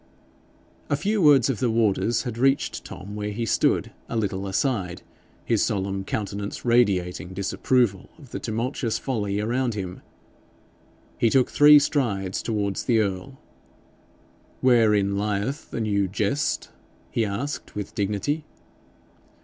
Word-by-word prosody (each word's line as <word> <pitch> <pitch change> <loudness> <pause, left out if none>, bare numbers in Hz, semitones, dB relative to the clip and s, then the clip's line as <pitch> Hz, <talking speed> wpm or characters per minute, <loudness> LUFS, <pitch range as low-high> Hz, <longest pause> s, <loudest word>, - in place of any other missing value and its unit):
A 145 - +2
few 205 +8 0
words 145 -6 +6
of 135 -6 -1
the 125 - +1
warder's 115 0 +1
had 120 -4 -4
reached 135 +2 +1
Tom 105 +2 -9
where 105 0 -3
he 115 +3 -3
stood - - +1 0.2
a - - -4
little 100 -2 -2
aside, 95 -4 -1 0.4
his 115 -3 +2
solemn 95 -3 -1
countenance 100 +1 -4
radiating 95 -6 +1
disapproval 100 +1 0
of 140 -7 -15
the - - -4
tumultuous 115 +1 -2
folly 105 -6 -2
around 120 +2 0
him. 95 -3 -5 1.2
He 115 - +4
took 130 +1 +3
three 150 0 +8
strides 115 -11 0
towards 100 -4 -2
the 120 -3 +3
earl. 105 +5 -2 1.2
'Wherein 105 -5 +3
lieth 105 +8 -2
the - - -4
new 100 -2 +1
jest?' 105 +9 -1 0.4
he 115 - +1
asked, 115 +8 -4
with 105 -2 -5
dignity. 105 +10 -1
110 Hz, 130 wpm, -25 LUFS, 100-130 Hz, 1.2 s, three